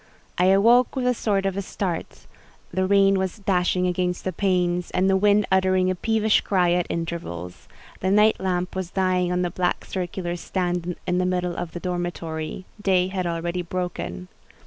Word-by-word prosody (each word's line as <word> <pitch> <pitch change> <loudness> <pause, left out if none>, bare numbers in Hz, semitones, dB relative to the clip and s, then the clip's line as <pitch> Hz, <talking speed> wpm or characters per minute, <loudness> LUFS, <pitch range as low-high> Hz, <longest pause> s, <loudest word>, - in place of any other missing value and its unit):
I 180 - +4
awoke 230 +8 +5
with 260 -2 -1
a 250 - +3
sort 200 -4 0
of 195 +1 -1
start; 185 -3 -4 0.5
the 185 +1 +1
rain 195 0 +4
was 190 +2 -2
dashing 180 -2 +1
against 180 0 -1
the 185 - -2
panes, 180 -1 0
and 185 - +1
the 195 - +4
wind 205 +1 +4
uttering 185 -1 +3
a - - -2
peevish 220 +2 +2
cry 180 -3 +2
at 175 0 +1
intervals; 165 - -5 0.3
the 190 - 0
night 210 +2 +4
lamp 180 -1 -2
was 185 -2 -3
dying 185 -1 +1
on 180 0 +1
the 175 - -1
black 180 0 -1
circular 175 -1 -3
stand 175 -1 -2
in 180 0 0
the 185 - +1
middle 180 -1 -1
of 170 -2 -5
the 175 - -5
dormitory: 175 -1 -4 0.2
day 185 -2 +2
had 185 -2 -2
already 170 +1 -2
broken. 125 - -4
180 Hz, 175 wpm, -24 LUFS, 175-190 Hz, 0.5 s, awoke